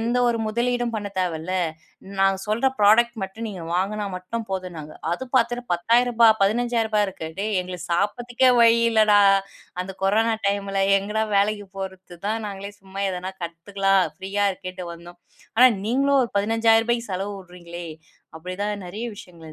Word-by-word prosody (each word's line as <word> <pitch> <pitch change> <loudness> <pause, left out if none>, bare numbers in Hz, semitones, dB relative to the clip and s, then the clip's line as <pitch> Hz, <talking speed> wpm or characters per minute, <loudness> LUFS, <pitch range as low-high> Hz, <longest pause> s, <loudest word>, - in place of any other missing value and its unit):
எந்த 235 +2 0
ஒரு 235 -1 +1
முதலீடும் 240 +2 -1
பண்ண 205 -2 -3
தேவைல்ல. 180 0 -2 0.6
நாங்க 195 0 +3
சொல்ற 220 +5 0
புராடெக்ட் 230 +3 +5
மட்டும் 190 +4 -5
நீங்க 185 -5 -7
வாங்குனா 205 +4 -1
மட்டும் 185 +6 -5
போதும்னாங்க. 175 -5 -5 0.2
அது 215 +9 -2
பாத்துட்டு 240 0 +2
ரூ.10000 235 +6 +3 0.2
ரூ.15000 225 0 +1
இருக்கு. 185 -4 -6
டேய்! 210 0 -1
எங்களுக்குச் 180 -1 -7
சாப்புட்றதுக்கே 240 +7 +1
வழி 230 0 +6
இல்லடா! 215 -2 +5 0.6
அந்தக் 190 +1 -7
கொரோனா 220 +4 +3
டைம்ல 200 -1 0 0.2
எங்கடா! 210 +3 -1
வேலைக்குப் 205 -1 0
போறது 190 -2 -7
தான். 220 +2 0
நாங்களே 200 0 -6
சும்மா 195 +1 -6
எதனா 185 +1 -5
கத்துக்கலாம். 195 +3 +1 0.2
ப்ரீயா 200 +2 0
இருக்கேன்டு 185 -1 -8
வந்தோம். 175 +1 -12 0.4
ஆனா, 255 +2 +8 0.2
நீங்களும் 275 +4 +2
ஒரு 235 - -3
ரூ.15000க்கு 225 +2 +2
செலவு 195 +2 -3
வுட்றீங்களே! 175 -2 -10 0.5
அப்பிடி 180 +3 -7
தான் 205 -2 -3
நிறைய 215 +7 -5
விஷயங்கள் 165 -4 -12
200 Hz, 145 wpm, -23 LUFS, 185-230 Hz, 0.6 s, ஆனா